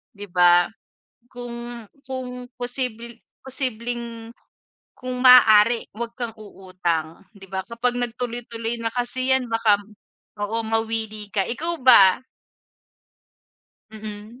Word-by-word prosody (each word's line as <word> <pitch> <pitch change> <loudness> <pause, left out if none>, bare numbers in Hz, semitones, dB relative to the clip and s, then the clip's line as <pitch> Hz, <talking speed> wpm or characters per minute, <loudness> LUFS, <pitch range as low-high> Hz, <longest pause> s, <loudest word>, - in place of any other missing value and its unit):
'Di 205 0 -8
ba? 175 -1 +5 0.6
Kung, 240 -1 -8 0.2
kung 250 -1 -6
posible 245 -2 -4 0.3
posibleng 235 -3 -4 0.7
kung 255 0 -6
maaari 230 -2 +7
wag 235 +1 -5
kang 235 -3 -4
uutang. 180 -6 -4 0.2
'Di 195 - -12
ba, 190 0 -3
kapag 240 +1 -1
nag 240 -2 -2
tuloy-tuloy 235 -1 -4
na 230 0 -2
kasi 255 +1 -2
yan 260 -1 0
baka 225 -2 +3 0.6
oo, 215 +3 -2
mawili 220 -1 -2
ka 195 - +3
ikaw 330 +8 -1
ba? 195 -5 +7 1.7
Mm. 215 +2 -9
230 Hz, 110 wpm, -23 LUFS, 210-245 Hz, 1.7 s, maaari